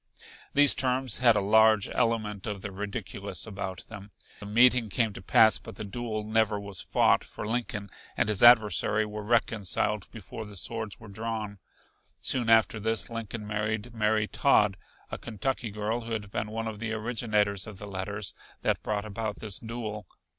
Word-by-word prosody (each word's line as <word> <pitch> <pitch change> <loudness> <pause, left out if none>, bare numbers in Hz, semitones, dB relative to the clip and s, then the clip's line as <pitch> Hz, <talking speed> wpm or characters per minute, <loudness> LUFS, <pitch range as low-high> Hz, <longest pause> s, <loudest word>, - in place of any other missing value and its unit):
These 145 -1 +7
terms 130 -2 +1
had 120 -3 +5
a 105 - +2
large 110 0 +4
element 110 -4 -1
of 100 -2 -4
the 100 - -5
ridiculous 100 -2 -5
about 95 -3 -6
them. 105 -2 -10 0.3
The 105 - -8
meeting 120 +1 +4
came 110 0 +1
to 95 - -9
pass 110 +3 +5
but - - -11
the 105 - -6
duel 110 +1 -4
never 110 -1 +1
was 100 -2 -4
fought, - - +3
for - - -7
Lincoln 110 -4 -3 0.3
and - - +2
his 105 -2 +1
adversary 110 -2 +5
were 105 0 -6
reconciled 105 -2 0
before 110 0 -8
the 105 -1 -10
swords 110 +3 -4
were 110 - -12
drawn. 105 -1 -5 0.6
Soon 120 -3 +1
after 110 -1 +4
this 110 +2 -1
Lincoln 115 -1 -5
married 105 +2 -3
Mary 105 -1 +1
Todd, 105 -8 +3 0.4
a - - -5
Kentucky 120 +2 -3
girl 105 +3 -2
who 115 0 -5
had 105 -2 -4
been 105 - -2
one 115 +1 -4
of 110 -2 -6
the 110 0 -3
originators 110 -3 0
of 105 -3 -9
the 105 - -8
letters 100 +1 -5 0.3
that - - 0
brought 105 0 -2
about 110 0 -4
this 105 -4 -3
duel. 110 -4 -6
110 Hz, 175 wpm, -28 LUFS, 105-115 Hz, 0.6 s, These